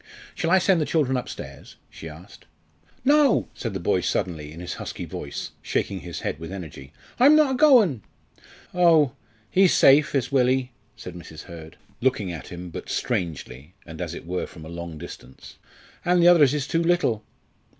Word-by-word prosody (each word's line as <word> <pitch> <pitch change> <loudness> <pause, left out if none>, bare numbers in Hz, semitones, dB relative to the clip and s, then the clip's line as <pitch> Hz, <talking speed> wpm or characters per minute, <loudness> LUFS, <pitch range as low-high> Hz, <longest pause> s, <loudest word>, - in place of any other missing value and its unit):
"Shall 165 - -2
I 190 - +5
send 185 -2 +3
the - - +1
children 145 -5 +1
upstairs?" 125 - -7 0.2
she 80 - -9
asked. 80 +4 -14 0.6
"No!" 285 -2 +4
said 115 -5 -5
the - - -2
boy, 90 +1 +1
suddenly, 80 -5 -2
in 80 - -10
his 90 - -5
husky - - -6
voice, 70 - -6
shaking 95 - -2
his 85 -2 -7
head - - -3
with 80 +2 -8
energy, 80 -8 -9 0.3
"I'm 280 +5 +7
not 305 -3 +4
a - - 0
going." 245 - +5 0.7
"Oh! 165 -6 +4 0.4
he's 190 -1 +4
safe 145 +2 +5
is 130 -1 0
Willie," 130 -1 +2 0.2
said 100 -5 -9
Mrs. 85 -3 -10
Hurd, 80 -3 -11 0.2
looking 120 -7 0
at 80 -5 -8
him, 90 0 -8
but - - -8
strangely, 75 -1 -4
and 80 +1 -9
as 85 -1 -4
it - - -9
were 90 +2 -3
from 80 -2 -12
a - - -9
long 85 -1 -7
distance, 65 -5 -12 0.4
"and 180 0 +3
the 170 - +5
others 150 -6 +5
is 145 -3 -2
too 165 +3 0
little." 165 -11 +1
110 Hz, 180 wpm, -24 LUFS, -, 0.7 s, I'm